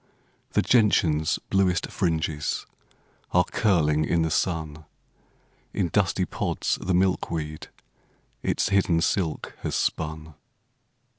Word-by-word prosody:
The - - +3
gentian's 85 -10 +3
bluest 95 -3 +1
fringes 80 -4 -1 0.7
Are 90 - +5
curling 80 -9 +2
in 85 +1 +1
the 80 - -1
sun; 80 -3 -1 0.9
In 90 -3 0
dusty 95 0 +1
pods - - -2
the 90 -1 0
milkweed 85 -4 -1 0.7
Its - - 0
hidden 95 -4 +2
silk 85 -3 -1
has - - -2
spun. 80 0 -2
85 Hz, 100 wpm, -25 LUFS, 80-95 Hz, 0.9 s, Are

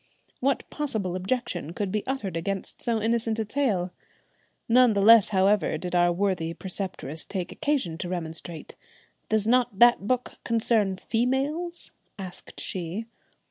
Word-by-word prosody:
What 275 +1 0
possible 220 -12 -2
objection 185 - -2
could 200 0 -2
be 210 0 -1
uttered 235 -10 -2
against 190 +3 -4
so 230 -2 0
innocent 225 0 0
a 220 - -1
tale? 210 -8 0 0.8
None 245 0 +6
the 200 - +1
less 225 -1 +8
however 195 -4 +2
did 180 +2 -5
our 175 0 +4
worthy 175 -3 -1
preceptress 185 -5 -4
take 185 -3 -4
occasion 270 - -1
to 180 - -4
remonstrate. 165 -2 -5 0.5
"Does 220 -1 +2
not 240 -3 +2
that 240 -3 +5
book 250 0 -1
concern 220 -4 +1
females?" 275 - -1 0.3
asked 185 -3 -8
she. 185 +4 -4
205 Hz, 140 wpm, -26 LUFS, 180-240 Hz, 0.8 s, less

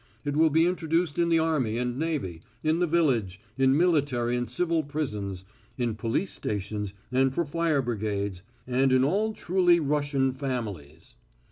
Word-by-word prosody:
It 145 0 -1
will 160 +1 +5
be 160 +2 +4
introduced 170 -2 0
in 170 0 +3
the 165 - +4
army 150 -9 +1
and 125 0 -1
navy, 145 - -2 0.2
in 160 +2 +2
the 175 - +2
village, 125 - +1 0.2
in 135 +1 +3
military 140 -8 +2
and 120 -1 -2
civil 165 +5 +1
prisons, 105 -11 -4 0.3
in 120 -3 0
police 115 - -2
stations 105 -1 -4 0.2
and 130 +1 +3
for 170 +6 -1
fire 155 -2 0
brigades, 100 -5 -2 0.2
and 130 +1 +2
in 130 0 +4
all 205 +10 +1
truly 175 -3 +3
Russian 145 -3 0
families. 105 - -6
135 Hz, 155 wpm, -27 LUFS, 115-160 Hz, 0.3 s, will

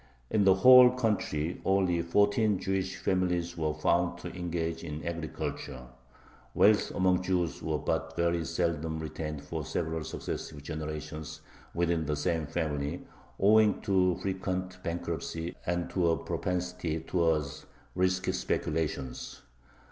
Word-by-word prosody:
In 105 -2 +3
the 95 -1 +6
whole 125 +5 +9
country 105 -10 -1
only 95 -3 +2
fourteen 100 +4 +3
Jewish 95 0 -2
families 90 -2 0
were 75 -2 -1
found 85 +3 +1
to - - -7
engage 85 -2 -3
in 75 -1 -6
agriculture. 75 -5 -5 0.7
Wealth 105 0 +5
among 90 0 +3
Jews 90 -3 -1
was 80 -2 -2
but - - -1
very 85 0 +1
seldom 85 -2 -1
retained 75 -1 -5
for - - -4
several 80 -1 -2
successive 75 -1 -6
generations 75 0 -6 0.3
within 85 -2 +1
the 75 - 0
same 80 0 -1
family, 75 0 -2 0.3
owing 105 +1 +5
to 90 -2 +3
frequent 95 -1 -3
bankruptcy 85 -1 -4
and 85 0 0
to 90 -3 +2
a 80 - +2
propensity 90 -3 -2
towards 80 -4 0 0.3
risky 95 0 +1
speculations. 75 -5 -3
85 Hz, 125 wpm, -30 LUFS, 80-95 Hz, 0.7 s, whole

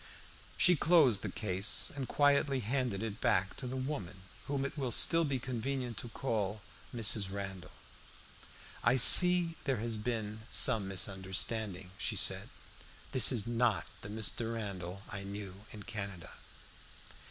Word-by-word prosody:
She 180 - +5
closed 150 - +3
the - - -4
case 100 -2 0
and 135 -3 -5
quietly 140 -2 +1
handed 120 -3 -2
it 110 -2 -6
back 95 +1 0
to 130 - -6
the 125 - -5
woman, 105 - -6 0.2
whom 140 -1 -2
it 140 - -6
will 135 -4 -3
still 165 +8 +5
be 140 -4 -1
convenient 125 0 -4
to 120 - -7
call 110 -4 -3 0.3
Mrs. 110 -4 +2
Randall. 95 -2 -7 1.1
"I 125 - +3
see 180 +5 +7
there 135 -3 0
has 115 0 -3
been 110 -1 -4
some 110 -6 +3
misunderstanding," 95 0 -3
she - - -1
said. - - 0 0.6
"This 130 -3 +6
is 115 -5 0
not 120 -3 0 0.2
the 100 - -9
Mr. 110 +2 -3
Randall 100 -3 -7
I 100 - -7
knew 100 0 -9
in 105 -1 -10
Canada." 100 -7 -7
110 Hz, 140 wpm, -32 LUFS, 100-130 Hz, 1.1 s, see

